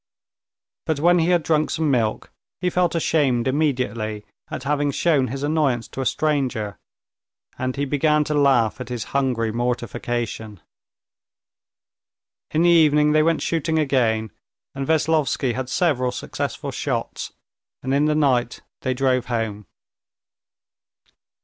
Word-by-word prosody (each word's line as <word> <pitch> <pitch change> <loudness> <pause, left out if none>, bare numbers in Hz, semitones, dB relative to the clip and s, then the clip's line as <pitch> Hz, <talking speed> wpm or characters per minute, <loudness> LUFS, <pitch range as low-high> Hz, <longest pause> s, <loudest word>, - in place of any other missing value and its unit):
But 155 -3 0
when 175 +3 +4
he 165 - +2
had 175 -3 +3
drunk 155 -1 +1
some 155 -2 0
milk, 115 -4 -1 0.3
he 180 +1 0
felt 180 -1 +1
ashamed 140 -7 +1
immediately 125 -7 -1 0.2
at - - -5
having 145 +1 0
shown 140 -2 +2
his 135 +4 -5
annoyance 145 -6 +1
to 135 - -5
a 130 - 0
stranger, 130 -7 -1 0.8
and 130 0 -2
he 140 0 -1
began 150 +2 +2
to 150 - -3
laugh 135 -5 +2
at 125 - -7
his 120 -3 -3
hungry 125 -5 0
mortification. 120 -2 -3 1.9
In 160 +2 +1
the 175 - +5
evening 150 -2 +5
they 155 0 +4
went 165 +1 +1
shooting 160 -1 0
again, 115 -7 +1 0.4
and 135 -1 -4
Veslovsky 155 -5 +1
had 130 0 -4
several 130 -6 +1
successful 125 - -4
shots, - - -3 0.5
and 130 +1 -1
in 145 +2 +3
the 150 0 +2
night 125 -5 +1 0.2
they 130 - -1
drove 130 -1 +1
home. 110 -5 -3
135 Hz, 135 wpm, -22 LUFS, 120-155 Hz, 1.9 s, the